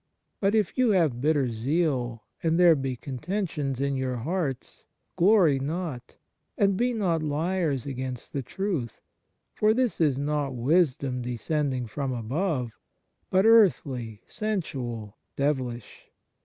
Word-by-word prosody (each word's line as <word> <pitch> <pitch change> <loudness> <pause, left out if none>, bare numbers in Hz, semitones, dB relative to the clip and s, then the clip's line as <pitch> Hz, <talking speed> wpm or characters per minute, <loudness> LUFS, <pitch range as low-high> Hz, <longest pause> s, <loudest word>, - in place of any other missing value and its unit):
But 200 +2 +2
if 215 +3 0
you 255 -2 +4
have 160 - +2
bitter 145 -4 +2
zeal, 125 -2 -1 0.2
and 165 +1 +1
there 175 -2 +7
be 135 -2 -2
contentions 140 - -3
in 140 0 0
your 130 -1 -1
hearts; 140 +1 -3 0.3
glory 175 -7 +4
not, 145 -3 -4 0.4
and 200 -1 +3
be 245 +5 +1
not 185 -8 0
liars 155 -2 -1
against 130 -2 -5
the 140 - -1
truth. 165 - -3 0.5
For 215 +1 +3
this 250 -7 0
is 145 -5 +3
not 145 -1 -1
wisdom, 135 -1 +1
descending 130 +2 -1
from 135 +3 -3
above, 125 - -2 0.5
but 190 +2 +3
earthly, 140 - +3
sensual, 130 - -4 0.2
devilish. 130 -6 -3
145 Hz, 125 wpm, -27 LUFS, 125-180 Hz, 0.5 s, there